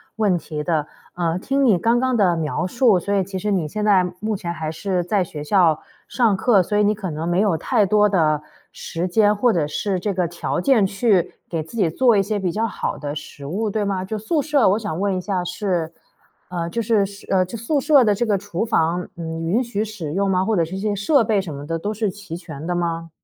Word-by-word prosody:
问 210 -4 +2
题 150 -1 -5
的。 155 -2 0 0.3
呃， 170 -1 0
听 275 +8 0
你 225 -8 +5
刚 230 +7 +2
刚 255 -1 +1
的 185 -4 +3
描 160 +2 -2
述， 225 -1 +3
所 200 +4 -2
以 195 -2 +2
其 190 0 -6
实 210 +3 -2
你 175 -6 0
现 210 +6 -3
在 195 -3 +5 0.2
目 215 0 -2
前 170 -3 -4
还 160 -2 -4
是 180 +2 -2
在 190 +1 +1
学 150 -3 -7
校 165 -2 +3 0.3
上 230 -5 +2
课， 200 -1 +3
所 205 - -3
以 210 - +4
你 210 +1 +2
可 195 -4 -5
能 160 +3 -3
没 175 +1 +1
有 200 -4 +2
太 200 +5 +1
多 210 +2 +4
的 155 -6 +2 0.3
时 170 +2 -4
间， 210 +3 +3
或 235 +2 +2
者 155 -4 0
是 190 +5 -2
这 205 +3 -1
个 180 -2 0
条 175 +1 -3
件 245 0 +3
去 195 -3 +1
给 165 -2 -2
自 160 +9 -10
己 195 -6 +3
做 235 +3 +3
一 195 - +3
些 210 +1 -2
比 185 -3 -1
较 220 +4 -1
好 225 - -3
的 145 -1 -5
食 145 -1 -9
物， 210 +9 -2
对 210 0 -1
吗？ 195 -2 -1
就 215 +3 -4
宿 290 +9 0
舍， 285 -5 +3
我 200 +3 +2
想 205 -7 -4
问 200 -1 0
一 185 - -2
下 185 -1 -2
是 175 -2 -2 0.6
呃， 170 -2 -3
就 230 - -1
是 215 -2 +2
是， 200 0 -10
呃 185 -1 +3
就 185 - -8
宿 285 +6 0
舍 285 -1 +5
的 210 -3 +3
这 240 - 0
个 210 -3 +2
厨 200 +1 -3
房， 175 -5 0
嗯， 165 -1 -5
允 215 +10 +1
许 220 -3 -2
使 185 -9 -6
用 200 +2 +1
吗？ 185 -1 +2
或 220 +2 0
者 170 -3 +2
是 180 - -7
一 - - -4
些 205 0 -1
设 235 +6 +3
备 215 -2 +1
什 180 -5 -4
么 140 +1 -8
的 165 +1 -1
都 205 +6 -3
是 215 -1 -1
齐 185 -4 -8
全 160 -4 -8
的 175 - -1
吗？ 165 -1 -2
195 Hz, 270 characters per minute, -21 LUFS, 170-215 Hz, 0.6 s, 你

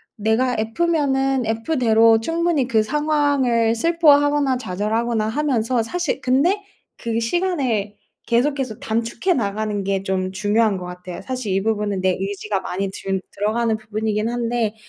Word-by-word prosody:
내가 225 +4 +1
F면은 270 +1 +1
F대로 225 -2 +3
충분히 330 +1 0
그 220 -4 +2
상황을 285 -5 +1
슬퍼하거나 290 -1 +3
좌절하거나 215 +2 -1
하면서 245 -2 0
사실 310 +4 -2
근데 285 +11 +2 0.4
그 230 -1 -2
시간을 235 - -1 0.3
계속해서 255 -1 0
단축해 230 - -1
나가는 210 -3 -2
게 195 0 -1
좀 185 -1 -1
중요한 205 +2 +1
것 180 - -7
같아요. 180 0 -8
사실 255 -4 -4
이 195 +1 +1
부분은 210 -2 -1
내 185 -1 +2
의지가 195 +1 -3
많이 195 +2 -3
든 195 0 -2
들어가는 220 +2 0
부분이긴 215 0 -2
한데 235 -2 -1
230 Hz, 315 characters per minute, -21 LUFS, 210-270 Hz, 0.4 s, F대로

